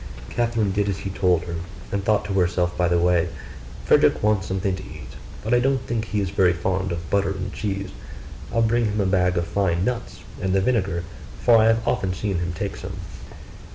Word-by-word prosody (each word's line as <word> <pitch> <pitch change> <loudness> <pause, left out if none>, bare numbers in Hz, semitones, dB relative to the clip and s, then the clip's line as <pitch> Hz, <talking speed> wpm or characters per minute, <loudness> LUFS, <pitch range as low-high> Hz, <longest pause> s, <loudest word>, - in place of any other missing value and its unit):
Catherine 115 -4 +1
did 100 +1 0
as 95 - -1
he 95 - -5
told 90 -3 +2
her, 85 -1 -5 0.3
and 100 -1 -1
thought 105 0 +2
to 100 - -3
herself 90 -1 +1
by 90 - +2
the 85 0 +2
way, 85 0 +3 0.6
'Frederick - - +4
wants 105 -3 +2
something 95 0 -1
to - - -8
eat; 75 -5 -10 0.3
but 110 +3 0
I 120 - +5
don't 135 +2 +2
think 115 -3 -3
he 105 +1 -1
is 95 -3 -1
very 95 -2 +4
fond 95 +2 -1
of 85 -1 -4
butter 100 0 +2
and 95 -1 -4
cheese: 100 -2 -3 0.6
I'll 115 0 +2
bring 115 +1 +2
him 105 0 -1
a 100 - +2
bag 90 -1 +2
of 85 - +1
fine 90 -1 0
nuts, 120 0 -3 0.2
and 95 0 0
the 95 - +4
vinegar, 95 -6 0 0.4
for 120 -1 +6
I 110 - +5
have 115 0 +2
often 95 -1 0
seen 95 -2 -1
him 90 0 -2
take 85 - -4
some. - - -7
95 Hz, 215 wpm, -23 LUFS, 90-105 Hz, 0.6 s, for